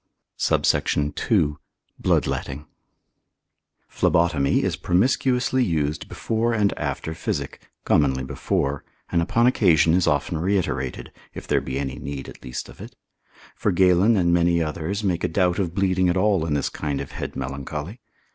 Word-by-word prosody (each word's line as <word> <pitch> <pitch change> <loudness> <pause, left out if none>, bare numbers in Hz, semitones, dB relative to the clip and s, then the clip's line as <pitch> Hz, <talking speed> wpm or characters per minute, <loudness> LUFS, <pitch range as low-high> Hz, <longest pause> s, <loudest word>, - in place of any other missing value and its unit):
SUBSECT. 75 0 0
II.—Bloodletting. 75 -1 -1 1.2
Phlebotomy 85 -5 +2
is - - 0
promiscuously 125 +6 +1
used 75 -6 -1
before 115 +1 -1
and 105 -2 +2
after 80 - -3
physic, - - -4 0.2
commonly 65 -3 +2
before, 70 +2 -2 0.3
and 85 - +2
upon 115 +8 +2
occasion 85 - +4
is 90 0 +2
often 75 +3 0
reiterated, 85 -8 -1 0.2
if - - -7
there - - +2
be 65 +1 -4
any 70 -2 -4
need 70 -1 -6
at - - -12
least 60 0 -6
of - - -14
it. - - -10 0.6
For - - 0
Galen, 95 +4 +4
and 85 -2 +2
many 85 0 +3
others, 80 +6 -3
make 90 -4 0
a - - +2
doubt 90 +1 +1
of 90 -3 -2
bleeding 95 -2 +2
at 90 - +1
all 95 -4 +2
in 75 - 0
this 70 - 0
kind 70 -2 -3
of - - -6
head - - -6
melancholy. 70 - -5
85 Hz, 145 wpm, -23 LUFS, 75-95 Hz, 1.2 s, occasion